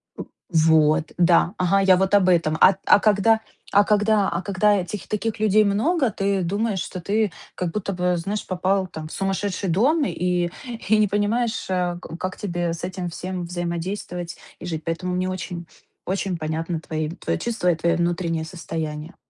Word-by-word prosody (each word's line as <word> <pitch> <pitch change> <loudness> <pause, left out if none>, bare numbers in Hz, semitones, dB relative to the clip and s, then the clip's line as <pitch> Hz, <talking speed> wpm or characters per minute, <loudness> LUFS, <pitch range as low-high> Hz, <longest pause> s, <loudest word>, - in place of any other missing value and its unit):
П - - -6 0.3
вот. 160 -1 +3
Да. 175 0 +4
Ага, 190 +2 +2
я 190 -1 +6
вот 190 +1 0
об 195 -2 +5
этом. 165 -3 +2
А 195 - +7
а - - +6
когда, 220 +2 +3 0.3
а 205 +1 +6
когда, 210 -1 +2
а 170 - -2
когда 205 +2 +2
этих, 190 +1 -5
таких 215 +1 -2
людей 215 0 +4
много, 255 - +2
ты 195 0 0
думаешь, 200 +3 -1
что 185 - -7
ты 210 +1 0 0.2
как 175 -2 -2
будто 195 0 -3
бы, 180 0 +1
знаешь, 200 +5 -3
попал 185 +1 0
там 160 -3 -7
в - - -12
сумасшедший 195 0 -2
дом 275 - +3
и, 180 -3 0 0.4
и 220 - +5
не 210 -1 +4
понимаешь, 215 +3 0
э, 180 -1 0 0.2
как 185 0 -4
тебе 175 -4 -2
с 170 - -8
этим 180 -1 -4
всем 180 +1 -5
взаимодействовать 175 0 -4 0.2
и - - -8
жить. 160 -3 -4
Поэтому 175 +2 -2
мне 185 +1 -1
очень, 175 -2 -5 0.4
очень 190 -1 -2
понятны 160 +1 -3
твои, 155 -1 -3
твои 180 - -3
чувства 220 -7 0
и - - 0
твое 170 +1 +1
внутреннее 170 -2 -1
состояние. 160 -2 -5
185 Hz, 175 wpm, -23 LUFS, 170-205 Hz, 0.4 s, А